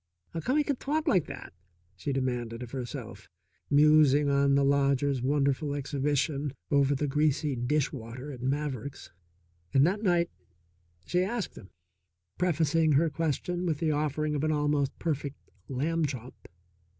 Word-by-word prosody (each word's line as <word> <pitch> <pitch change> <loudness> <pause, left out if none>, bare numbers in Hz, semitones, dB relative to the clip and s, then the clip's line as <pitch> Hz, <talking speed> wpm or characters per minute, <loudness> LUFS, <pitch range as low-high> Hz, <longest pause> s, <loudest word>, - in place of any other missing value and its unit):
"How 165 - -4
come 255 - 0
he 300 - +4
c'n 285 -3 -1
talk 305 +5 -1
like 185 - +3
that?" - - -8 0.4
she 140 - -4
demanded 125 -3 -2
of 120 - -9
herself, 120 -5 -7 0.4
musing 150 -1 +5
on 140 0 +3
the 140 - +4
lodger's 140 -1 +2
wonderful 140 +2 +1
exhibition 145 0 -1 0.2
over 140 0 +3
the 145 - -1
greasy 150 0 +1
dish 135 +4 0
water 125 +3 -7
at 125 -3 -9
Maverick's. 140 -1 -3 0.6
And 135 +1 +6
that 195 +5 0
night 175 -4 +2 0.7
she 180 - +1
asked 215 +2 -3
him, 95 - -12 0.7
prefacing 160 -2 +2
her 155 +3 +3
question 165 +4 -1
with 160 -3 0
the 160 0 0
offering 150 0 0
of 145 0 -1
an 155 - +2
almost 145 -2 0
perfect 145 -3 -3 0.3
lamb 155 +4 0
chop. 130 -2 -6
145 Hz, 150 wpm, -29 LUFS, 135-155 Hz, 0.7 s, And